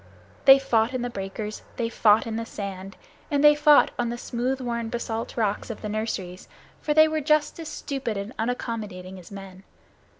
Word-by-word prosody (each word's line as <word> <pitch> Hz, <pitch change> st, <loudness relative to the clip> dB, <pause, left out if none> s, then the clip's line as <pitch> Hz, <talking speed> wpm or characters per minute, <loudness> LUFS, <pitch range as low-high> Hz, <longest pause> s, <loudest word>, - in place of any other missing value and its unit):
They 270 Hz, 0 st, +10 dB
fought 240 Hz, -2 st, +1 dB
in 250 Hz, -, -2 dB
the 245 Hz, -, -3 dB
breakers, 210 Hz, +1 st, -5 dB
they 235 Hz, -, -1 dB
fought 220 Hz, -2 st, +4 dB
in 225 Hz, -1 st, -4 dB
the 230 Hz, -, -2 dB
sand, 195 Hz, -3 st, -7 dB, 0.3 s
and 285 Hz, -2 st, +1 dB
they 295 Hz, 0 st, +9 dB
fought 295 Hz, 0 st, +5 dB
on 240 Hz, -1 st, 0 dB
the 240 Hz, -, -4 dB
smooth 250 Hz, +2 st, -2 dB
worn 235 Hz, -2 st, -3 dB
basalt 230 Hz, -1 st, -4 dB
rocks 210 Hz, -1 st, -1 dB
of 225 Hz, -, -7 dB
the 210 Hz, -, -3 dB
nurseries, 200 Hz, -4 st, -4 dB, 0.3 s
for 300 Hz, -, 0 dB
they 310 Hz, 0 st, +7 dB
were 310 Hz, 0 st, -1 dB
just 300 Hz, +2 st, +1 dB
as 325 Hz, -, -6 dB
stupid 270 Hz, -7 st, -4 dB
and 200 Hz, +4 st, -5 dB
unaccommodating 215 Hz, -6 st, -4 dB
as 175 Hz, -, -14 dB
men. 195 Hz, -2 st, -10 dB
230 Hz, 190 wpm, -25 LUFS, 205-270 Hz, 0.3 s, They